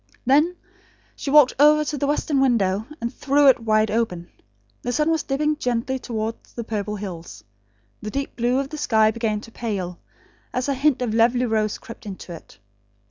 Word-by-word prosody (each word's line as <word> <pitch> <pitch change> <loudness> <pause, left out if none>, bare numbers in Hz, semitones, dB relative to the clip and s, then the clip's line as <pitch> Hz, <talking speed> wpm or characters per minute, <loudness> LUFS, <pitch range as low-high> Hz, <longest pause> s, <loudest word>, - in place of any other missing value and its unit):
Then 300 +7 +3 0.6
she - - -5
walked, 290 -2 +6
over 300 +1 +6
to 300 - -3
the 285 0 -1
western 290 -1 +1
window, 220 -5 +1
and 235 -3 -4
threw 285 +1 +2
it 260 - +4
wide 215 -1 +2
open. 195 -7 -2 0.5
The 245 - -2
sun 300 +6 +1
was 320 -2 +1
dipping 300 +2 -1
gently 250 +1 -1
towards 225 -2 -5
the 235 - -5
purple 210 -2 -3
hills. 170 - -8 0.6
The 215 - -5
deep 275 +5 -4
blue 240 +2 +1
of 275 0 -2
the 305 0 -7
sky 220 -5 +3
began 220 -2 -2
to 230 - -13
pale, 195 -7 -4 0.6
as 250 +1 -1
a 280 - +1
hint 270 -1 +1
of 225 -3 -2
lovely 240 +2 +3
rose 215 -2 0
crept 230 -3 -11
into 190 -2 -8
it. 165 - -13
235 Hz, 185 wpm, -23 LUFS, 215-275 Hz, 0.6 s, walked